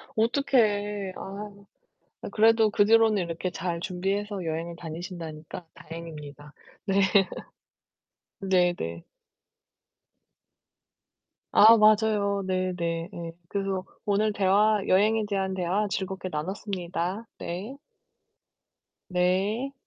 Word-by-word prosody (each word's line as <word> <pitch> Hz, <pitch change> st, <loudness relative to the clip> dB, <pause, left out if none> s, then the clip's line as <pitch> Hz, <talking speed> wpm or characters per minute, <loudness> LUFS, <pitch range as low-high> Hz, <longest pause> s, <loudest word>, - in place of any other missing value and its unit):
어떡해. 210 Hz, -5 st, +1 dB
아유. 200 Hz, +1 st, -8 dB, 0.6 s
아 -, -, -6 dB
그래도 225 Hz, -1 st, +4 dB
그 205 Hz, -, +4 dB
뒤로는 220 Hz, -2 st, +4 dB
이렇게 170 Hz, +2 st, -4 dB
잘 170 Hz, -1 st, -3 dB
준비해서 195 Hz, +2 st, -3 dB
여행을 165 Hz, +1 st, -4 dB
다니신다니까 165 Hz, -1 st, -8 dB
다행입니다. 150 Hz, -3 st, -10 dB, 0.3 s
네. 195 Hz, 0 st, +1 dB, 1.4 s
네네. 175 Hz, -, 0 dB, 2.5 s
아 225 Hz, +2 st, +9 dB
맞아요. 210 Hz, -2 st, +3 dB
네 185 Hz, 0 st, 0 dB
네 170 Hz, 0 st, -3 dB
네. 170 Hz, -1 st, -6 dB, 0.2 s
그래서 195 Hz, -2 st, -2 dB, 0.2 s
오늘 210 Hz, +1 st, +1 dB
대화 205 Hz, +2 st, +3 dB
여행에 215 Hz, +3 st, +3 dB
대한 190 Hz, -1 st, -1 dB
대화 190 Hz, +3 st, 0 dB
즐겁게 190 Hz, -1 st, -4 dB
나눴습니다. 185 Hz, +4 st, -4 dB
네. 200 Hz, +11 st, -6 dB, 1.3 s
네. 195 Hz, +9 st, 0 dB
190 Hz, 210 characters per minute, -27 LUFS, 175-210 Hz, 2.5 s, 아